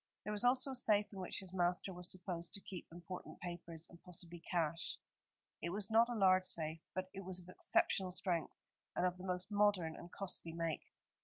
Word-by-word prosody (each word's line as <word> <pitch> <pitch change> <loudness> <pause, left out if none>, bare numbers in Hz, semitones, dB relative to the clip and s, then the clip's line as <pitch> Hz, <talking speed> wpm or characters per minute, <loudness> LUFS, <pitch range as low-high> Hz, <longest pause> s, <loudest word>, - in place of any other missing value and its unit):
There 210 - -2
was 210 - +2
also 255 +2 +5
a - - -3
safe 210 -4 +3
in 195 - -6
which 185 - -2
his 185 -1 -3
master 180 +1 +1
was 180 0 -1
supposed 175 -2 -2
to - - -1
keep 185 -3 -7
important 175 +2 -7
papers, 170 -2 -6
and 170 - -15
possibly 175 -1 -4
cash. 165 -1 0 0.6
It 170 - -1
was 200 +3 -1
not 230 +2 +6
a 240 - -1
large 185 -3 +5
safe, 160 -1 +2 0.2
but 185 0 -2
it 195 0 -6
was 185 0 -1
of 180 0 -13
exceptional 185 0 +2
strength, 180 -2 0 0.4
and 180 - +2
of 180 0 0
the - - -7
most 180 +2 -1
modern 205 -6 +3
and 175 - -10
costly 180 -4 -1
make. 165 -2 -2
180 Hz, 205 wpm, -39 LUFS, 170-195 Hz, 0.6 s, not